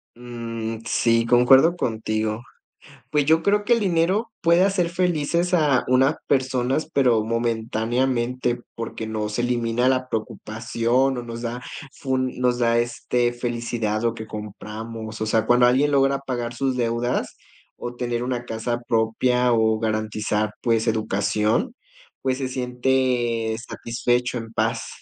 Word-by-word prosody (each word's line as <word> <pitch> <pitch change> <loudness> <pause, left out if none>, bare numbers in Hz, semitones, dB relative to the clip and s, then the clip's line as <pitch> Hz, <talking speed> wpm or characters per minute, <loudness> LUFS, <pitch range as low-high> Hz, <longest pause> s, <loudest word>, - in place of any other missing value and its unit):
Mm, 115 -2 -5
sí, 115 -1 +2
concuerdo 130 +7 +5
contigo, 110 -4 -2 0.7
pues 150 -2 +2
yo 160 +2 +4
creo 205 +3 +2
que, 240 +3 +3
el 230 - +2
dinero 190 +4 +1
puede 170 +2 +4
hacer 190 -3 +1
felices 175 0 0
a 150 -6 +3
unas 130 +4 +3
personas, 130 +2 0
pero 125 -6 +3
momentáneamente, 120 +2 -1 0.2
porque 115 -1 -5
no 110 -1 -2
se 110 +3 -2
elimina 120 0 0
la 130 -1 0
preocupación, 115 +4 -1
o 120 - -4
nos 115 0 -7
da, 120 +1 -4 0.3
fun 130 -1 -1
nos 125 -1 +1
da, 115 -1 +3
este, 120 0 0
felicidad 120 -3 -2
lo 115 - +1
que 110 -1 -8
compramos, 110 +1 -7
o - - +1
sea, 110 0 +1
cuando 125 0 +5
alguien 135 +4 +3
logra 135 0 +3
pagar 120 -3 -4
sus 130 +1 -1
deudas, 120 +1 -1 0.4
o 120 0 -6
tener 120 -1 -2
una 125 -1 -3
casa 120 +1 -3
propia 125 +2 +2
o 110 -1 +2
garantizar, 110 -1 -1
pues, 115 -1 +1
educación, 110 - 0 0.5
pues, 130 -1 0
se 135 -2 -2
siente 125 -3 0
satisfecho, 120 +1 -1
en 115 -1 -7
paz. - - -1
120 Hz, 140 wpm, -23 LUFS, 115-130 Hz, 0.7 s, concuerdo